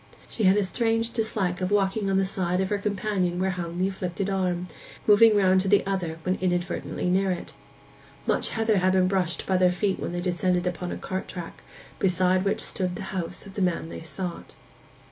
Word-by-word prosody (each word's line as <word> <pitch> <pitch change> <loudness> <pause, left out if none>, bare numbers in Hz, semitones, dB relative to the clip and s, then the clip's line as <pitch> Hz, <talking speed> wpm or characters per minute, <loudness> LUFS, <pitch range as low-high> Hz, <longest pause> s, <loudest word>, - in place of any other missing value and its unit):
She 220 - -2
had 190 +2 +5
a 205 - +3
strange 225 +3 0
dislike 210 -6 -1
to 185 - -1
walking 200 +1 +1
on 195 - +2
the 195 - +3
side 185 -2 -1
of 190 0 0
her 205 - 0
companion 200 -3 -1
where 190 +1 +1
hung 175 -2 -5
the 185 +1 +2
afflicted 190 0 -3
arm, 180 -2 -1 0.4
moving 215 +1 +7
round 190 -2 +4
to 195 - -3
the 200 0 +4
other 180 -5 -2
when 185 +1 0
inadvertently 175 -1 -1
near 190 +2 +2
it. 180 -2 -4 0.7
Much - - +1
heather 220 -2 +1
had 185 0 +3
been 185 -1 +4
brushed 185 -3 0
by 190 - +2
their 180 -1 +4
feet 190 +2 -1
when - - -3
they 175 - -3
descended 180 0 0
upon 180 0 -3
a - - -4
cart 190 0 -4
track, 175 -2 -8 0.4
beside 185 0 +2
which 200 - 0
stood 180 -2 0
the - - -6
house 180 0 -4
of 195 - -11
the 200 - -3
man 175 -3 0
they - - -7
sought. 165 +3 -6
185 Hz, 205 wpm, -26 LUFS, 180-195 Hz, 0.7 s, moving